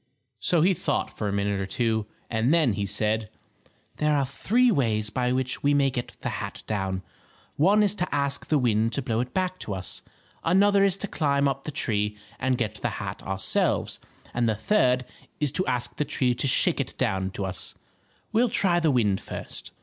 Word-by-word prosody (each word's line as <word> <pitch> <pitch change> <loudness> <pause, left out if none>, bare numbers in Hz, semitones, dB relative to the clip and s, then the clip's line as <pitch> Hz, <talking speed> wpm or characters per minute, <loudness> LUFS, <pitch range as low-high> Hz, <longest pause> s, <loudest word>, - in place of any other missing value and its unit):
So 160 - +2
he 185 +4 +4
thought 185 +2 -2
for 105 - -2
a - - -1
minute 100 0 0
or 95 - -2
two, 110 0 0 0.2
and 115 +3 +1
then 155 -9 +4
he 100 0 -2
said: 105 +2 0 0.7
"There 150 0 +2
are 140 - +2
three 240 - +2
ways 110 - 0
by 125 +2 0
which 130 0 -1
we 145 0 +3
may 140 -1 +3
get 120 -1 -5
the - - -2
hat - - -6
down. 95 -3 -2 0.5
One 200 +8 +4
is 205 -1 +2
to 180 - 0
ask 140 -1 -1
the 155 - +3
wind 115 -3 +2
to 140 - 0
blow 115 -3 -1
it 125 +1 -2
back 185 -1 -1
to 100 - -3
us, 95 -1 -2 0.4
another 200 +3 +4
is 195 -1 +3
to 205 - -2
climb 140 -5 +1
up 135 0 -2
the 155 - -3
tree 105 -6 -1 0.2
and 130 -1 +1
get 110 -3 -3
the - - 0
hat - - -5
ourselves, 95 0 +1 0.3
and 120 -1 +1
the 110 - +1
third 125 - +2 0.3
is 150 -3 +1
to 165 +4 0
ask 125 -1 -1
the - - +1
tree 130 -3 +1
to 125 +3 -1
shake 125 - +3
it - - -3
down 95 0 0
to 100 - -3
us. 95 -1 -2 0.6
We'll 230 +2 +3
try 175 -4 +3
the 165 -2 +2
wind 105 -8 +2
first." - - -8
125 Hz, 205 wpm, -26 LUFS, 105-155 Hz, 0.7 s, he